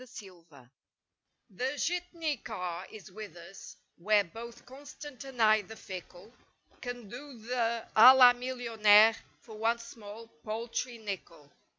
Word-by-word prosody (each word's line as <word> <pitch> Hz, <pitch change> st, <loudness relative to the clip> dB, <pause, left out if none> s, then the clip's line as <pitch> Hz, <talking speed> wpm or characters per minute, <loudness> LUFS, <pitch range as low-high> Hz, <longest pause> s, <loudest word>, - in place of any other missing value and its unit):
39 190 Hz, -8 st, -13 dB
DER 145 Hz, -, -17 dB
JITNEY 125 Hz, -2 st, -18 dB, 0.8 s
The 255 Hz, +9 st, -3 dB
Jitney 340 Hz, -3 st, -2 dB
car 180 Hz, -3 st, -6 dB
is 210 Hz, -3 st, -12 dB
with 210 Hz, -1 st, -9 dB
us, 170 Hz, +3 st, -12 dB, 0.2 s
where 205 Hz, +3 st, +3 dB
both 230 Hz, +6 st, -11 dB
constant 285 Hz, +1 st, -11 dB
and 265 Hz, -2 st, -11 dB
i 215 Hz, -1 st, +5 dB
the 220 Hz, +3 st, -12 dB
fickle, 185 Hz, +2 st, -10 dB, 0.5 s
Can 245 Hz, -3 st, -7 dB
do 255 Hz, +4 st, -10 dB
the 230 Hz, 0 st, -2 dB
a 250 Hz, +4 st, +10 dB
la 250 Hz, -2 st, +8 dB
millionaire 225 Hz, -4 st, +4 dB, 0.3 s
for 220 Hz, -2 st, -12 dB
one 230 Hz, +2 st, +1 dB
small, 230 Hz, -1 st, -11 dB, 0.2 s
paltry 230 Hz, +2 st, -4 dB
nickle. 185 Hz, -9 st, -8 dB
225 Hz, 135 wpm, -30 LUFS, 205-250 Hz, 0.8 s, a